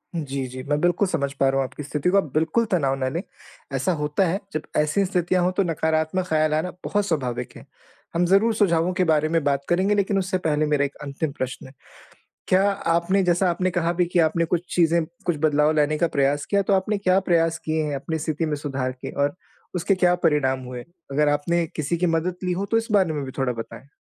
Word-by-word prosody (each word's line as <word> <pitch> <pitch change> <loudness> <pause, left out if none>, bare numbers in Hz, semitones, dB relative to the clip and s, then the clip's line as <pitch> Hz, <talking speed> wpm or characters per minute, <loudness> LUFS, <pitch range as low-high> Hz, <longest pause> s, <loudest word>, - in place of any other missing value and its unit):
जी, 140 -4 -3
जी। 130 +1 -7
मैं 145 0 +2
बिल्कुल 175 +3 +2
समझ 140 -6 -1
पा 135 - +4
रहा 135 - 0
हूँ 135 - +2
आपकी 150 - -9
स्थिति 145 +3 -1
को। 195 - +3
आप 155 -8 0
बिल्कुल 160 +9 +1
तनाव 140 -7 +2
ना 130 - 0
लें। 165 +6 -3 0.5
ऐसा 185 - +1
होता 150 +4 0
है, 180 +4 -1
जब 155 - -1 0.2
ऐसी 155 +6 +2
स्थितियाँ 180 -1 +1
हो, 180 - +2
तो 185 +2 +1
नकारात्मक 160 +1 0
ख़्याल 155 -1 +2
आना 160 +4 -1
बहुत 205 0 0
स्वाभाविक 130 -9 -2
है। - - -13 0.5
हम 175 +1 +2
ज़रूर 200 +6 +4
सुझावों 180 -4 +2
के 185 0 +1
बारे 155 -1 +2
में 165 -1 +1
बात 140 -1 0
करेंगे, 190 +4 +2
लेकिन 200 0 +1
उससे 190 0 -1
पहले 155 -4 0
मेरा 150 -1 +2
एक 140 - -6
अंतिम 145 +2 -3
प्रश्न 130 -2 -5
है। 130 - -15 0.7
क्या 185 +1 +4
आपने 185 0 +1
जैसा 180 +1 +2
आपने 180 +2 0
कहा 170 -1 0
भी 175 0 +1
कि 175 +1 0
आपने 165 +1 +2
कुछ 175 +1 -1
चीज़ें, 170 -1 +3 0.2
कुछ 175 -3 0
बदलाव 150 -1 +3
लाने 150 0 +2
का 170 - +2
प्रयास 140 +1 +2
किया, 200 -1 +1
तो 200 +1 +1
आपने 195 +2 +1
क्या 190 -1 +3
प्रयास 165 -1 +3
किए 155 0 0
हैं 145 -1 -2
अपनी 160 +4 -3
स्थिति 155 +1 -2
में 155 -1 -1
सुधार 135 -3 -3
के? 125 - -8
और 145 +2 0 0.4
उसके 180 +3 +1
क्या 180 -1 +3
परिणाम 135 -4 +2
हुए? 125 -1 -6 0.3
अगर 150 +2 +2
आपने 165 +4 +1
किसी 155 +2 -1
की 180 - +1
मदद 165 +1 0
ली 180 - 0
हो, 190 +3 -2
तो 225 - +1
इस 225 0 -1
बारे 190 -6 +3
में 145 -2 -3
भी 130 - -7
थोड़ा 135 -2 0
बताएँ? 115 +4 -9
165 Hz, 230 wpm, -23 LUFS, 145-180 Hz, 0.7 s, पा